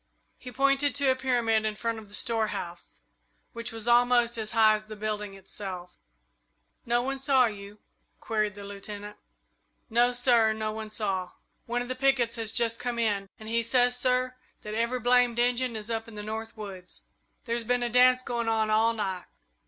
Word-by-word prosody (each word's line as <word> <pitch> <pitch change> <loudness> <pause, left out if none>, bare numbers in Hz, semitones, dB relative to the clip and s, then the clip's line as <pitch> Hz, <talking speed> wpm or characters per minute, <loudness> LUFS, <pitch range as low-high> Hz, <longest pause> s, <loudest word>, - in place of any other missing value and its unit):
He 250 - -9
pointed 275 +1 +2
to 280 -2 +3
a - - +1
pyramid 240 -4 +1
in 215 -1 -1
front 230 0 -2
of 210 -2 -14
the 205 - -5
storehouse, 215 -8 -3 0.5
which 230 0 -5
was 225 0 -5
almost 240 0 +4
as 220 -1 -4
high 220 -2 +6
as 215 0 -3
the 215 0 -8
building 210 -1 -4
itself. 190 -2 -7 0.9
"No 240 +1 +2
one 270 +1 -3
saw 265 -1 +4
you?" 205 -2 -6 0.4
queried 215 -3 -1
the 205 - -9
Lieutenant. 205 +1 -8 0.8
"No, 240 +2 +4
sir; 240 -3 +3
no 215 0 -3
one 215 0 -6
saw. 195 -4 -2 0.3
One 240 +1 -1
of - - -9
the 255 - -2
pickets 255 -3 +2
has 225 -2 -2
just 230 0 +1
come 245 -1 -3
in, 205 -4 0
and 215 - -10
he 230 +1 +1
says, 245 +1 +3
sir, 255 0 +1 0.3
that 210 - -6
every 235 +3 0
blamed 245 0 +3
Injun 245 0 +1
is 215 +1 -5
up 225 0 -2
in 225 - -11
the 210 - -6
north 220 +1 -6
woods. 190 -4 -8 0.4
There's 235 -1 -1
been 245 +1 +1
a - - +1
dance 250 +1 +5
going 235 -2 -2
on 220 -1 +1
all 225 +2 +3
night." 190 -5 -3
230 Hz, 185 wpm, -28 LUFS, 215-245 Hz, 0.9 s, high